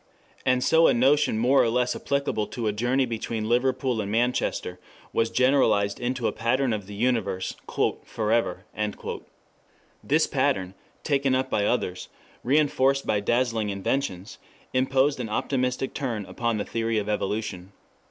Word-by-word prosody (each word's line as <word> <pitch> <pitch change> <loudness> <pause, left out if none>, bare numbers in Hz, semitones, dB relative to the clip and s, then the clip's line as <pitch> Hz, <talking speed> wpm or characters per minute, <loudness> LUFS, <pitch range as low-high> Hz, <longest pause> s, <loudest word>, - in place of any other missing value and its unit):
] - - -30
And 125 0 +3
so 165 0 +5
a - - +3
notion 135 0 +3
more 125 +5 +4
or 115 - +2
less 125 +1 +1
applicable 140 -6 -1
to 120 - -5
a 105 - +2
journey 125 +5 +1
between 115 -2 -3
Liverpool 125 0 +1
and 100 0 -4
Manchester 120 +3 -1 0.3
was 115 0 +1
generalized 125 -6 +2
into 125 0 -2
a - - +2
pattern 120 +2 0
of 100 -3 -4
the 105 - -8
universe 100 -5 0
"for 110 0 -2
ever." 105 -5 0 1.4
This - - +3
pattern, 95 -1 0 0.3
taken 140 -2 +1
up 130 0 -1
by 100 - +1
others, 90 -7 -2 0.3
reinforced 135 0 +2
by 105 - +1
dazzling 115 0 0
inventions, 100 -1 -3 0.3
imposed 130 +2 +2
an 115 -3 -3
optimistic 130 +3 -1
turn 115 -7 -3
upon 115 +1 -2
the 105 - -2
theory 115 0 -1
of 105 -1 -1
evolution. 105 -3 -3
120 Hz, 150 wpm, -26 LUFS, 105-130 Hz, 1.4 s, so